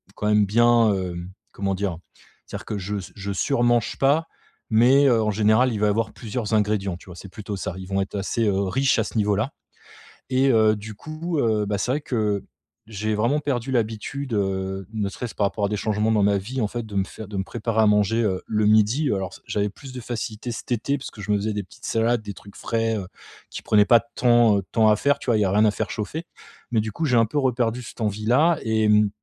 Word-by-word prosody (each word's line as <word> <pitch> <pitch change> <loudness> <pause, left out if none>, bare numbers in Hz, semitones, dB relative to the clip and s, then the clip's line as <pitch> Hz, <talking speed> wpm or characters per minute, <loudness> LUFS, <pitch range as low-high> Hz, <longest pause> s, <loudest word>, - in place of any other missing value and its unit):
quand 105 - -2
même 105 -1 +4
bien, 115 +1 +4
hem, 90 -1 -5 0.2
comment 95 -1 -2
dire? 95 -3 -2 0.5
C'est - - -9
à - - -1
dire - - -13
que 105 - -4
je 100 +2 -3
s 95 - -7
je 100 0 -5
surmange 120 +1 +1
pas 145 +4 +3 0.4
mais, 125 +6 +5
heu, 120 -4 +4
en 105 -1 +1
général 110 +5 +3
il 105 - -3
va 105 0 +3
avoir 110 +2 0
plusieurs 110 0 -4
ingrédients, 105 -4 0
tu - - -17
vois? 90 - -10
C'est 95 +2 -10
plutôt 105 +1 -6
ça, 90 -1 -4
ils 95 -1 -8
vont 95 0 0
être, 95 - -5
heu, - - -1
assez 110 +3 0
riches 100 +9 +1
à - - +2
ce - - -8
niveau 105 -1 +2
là 115 +8 -1 0.8
et 135 +1 +3
heu, 110 -2 +4
du 110 +1 -8
coup 155 - -4
heu, 110 -4 +1
bah, 100 0 -1
c'est 115 +5 -1
vrai, 145 +3 0
que, 105 -7 -1 0.4
j'ai 110 0 -2
vraiment 120 +8 +1
perdu 135 -4 -2
l'habitude 120 +3 -2
,heu, 95 -2 -2
ne 105 -3 -1
serait-ce 115 +3 -7
par 105 - +1
rapport 100 +1 -2
à - - -1
des 105 - -1
changements 105 +1 0
dans 105 -2 +3
ma 100 0 +3
vie 120 +8 -5
en 110 - +1
fait 120 +2 -5
de 105 -2 -9
me 95 - +2
fai 110 +2 -10
de 100 0 -6
me 95 - 0
préparer 110 +2 -1
à - - +5
manger, 105 +2 +3
heu, 95 -4 0
le 105 -1 +1
midi 110 +8 +3
alors 95 -2 -3
s - - -13
j'avais 105 0 0
plus 130 +6 -12
de 125 - -6
facilité 115 0 -5
cet 115 - -8
été 125 +4 0
parce 140 - -8
que 105 - -11
je 105 - -8
me 105 - +3
faisais 105 +2 -2
des 105 -1 -3 0.2
salades 115 +1 +1
des 105 -1 -6
trucs 100 +1 -15
frais, 115 -1 -1
heu, 95 -3 -5 0.4
qui - - -6
prenaient 105 -1 +4
pas 120 +1 +6
tant 120 -1 +3
de 100 - -2
temps 110 -2 +4
à 105 - +5
faire, 140 +6 +1
tu - - -11
vois? 120 -3 +3
Il - - +1
y - - +3
a 95 - 0
rien 105 +2 +4
à 105 - +4
faire - - -3
chauffer 150 +10 -4 0.5
mais 115 -2 +2
du 110 0 -4
coup 160 - -2
j'ai 125 -5 +3
un 115 - +5
peu 145 - -4
reperdu 125 -2 0
cette 120 - -10
envie 105 0 -2
là 150 +8 +4
et, 110 -1 +1
mmh, 105 0 +4
110 Hz, 255 wpm, -23 LUFS, 100-120 Hz, 0.8 s, pas